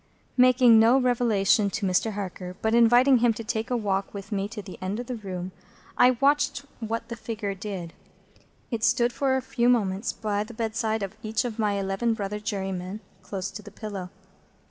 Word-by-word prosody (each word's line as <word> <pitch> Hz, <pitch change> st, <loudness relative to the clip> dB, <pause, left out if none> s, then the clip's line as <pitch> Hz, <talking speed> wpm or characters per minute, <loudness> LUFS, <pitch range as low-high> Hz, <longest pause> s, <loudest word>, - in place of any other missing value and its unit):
Making 250 Hz, -2 st, +6 dB
no 235 Hz, +4 st, +6 dB
revelation 230 Hz, -4 st, +2 dB
to 210 Hz, +1 st, -3 dB
Mr. 190 Hz, +4 st, +1 dB
Harker, 185 Hz, -2 st, -6 dB
but 220 Hz, 0 st, +2 dB
inviting 240 Hz, +3 st, +6 dB
him 235 Hz, -1 st, +3 dB
to 230 Hz, -, -6 dB
take 220 Hz, 0 st, -3 dB
a 250 Hz, -, +1 dB
walk 200 Hz, -2 st, -2 dB
with 200 Hz, +2 st, -8 dB
me 200 Hz, -1 st, -1 dB
to 215 Hz, +1 st, -8 dB
the 195 Hz, -2 st, -9 dB
end 190 Hz, +4 st, -3 dB
of 245 Hz, -, -4 dB
the 250 Hz, -, -4 dB
room, 185 Hz, -4 st, -6 dB, 0.4 s
I 250 Hz, 0 st, +5 dB
watched 280 Hz, 0 st, +2 dB
what 230 Hz, 0 st, -4 dB
the 235 Hz, -, -4 dB
figure 220 Hz, -3 st, -4 dB
did. 190 Hz, -4 st, -6 dB, 0.8 s
It 230 Hz, -2 st, -2 dB
stood 240 Hz, +1 st, +3 dB
for 265 Hz, -1 st, +1 dB
a 260 Hz, -, -3 dB
few 245 Hz, -2 st, +1 dB
moments 205 Hz, -3 st, +1 dB
by 210 Hz, -1 st, -2 dB
the 225 Hz, +2 st, -11 dB
bedside 220 Hz, -1 st, -1 dB
of 195 Hz, +2 st, -5 dB
each 215 Hz, 0 st, -1 dB
of 235 Hz, -2 st, -5 dB
my 210 Hz, -2 st, +1 dB
eleven 200 Hz, +4 st, 0 dB
brother 210 Hz, -1 st, -4 dB
jurymen, 195 Hz, -1 st, -4 dB, 0.2 s
close 195 Hz, -1 st, -5 dB
to 210 Hz, -, -8 dB
the 210 Hz, -, -11 dB
pillow. 205 Hz, -3 st, -6 dB
220 Hz, 190 wpm, -26 LUFS, 195-235 Hz, 0.8 s, Making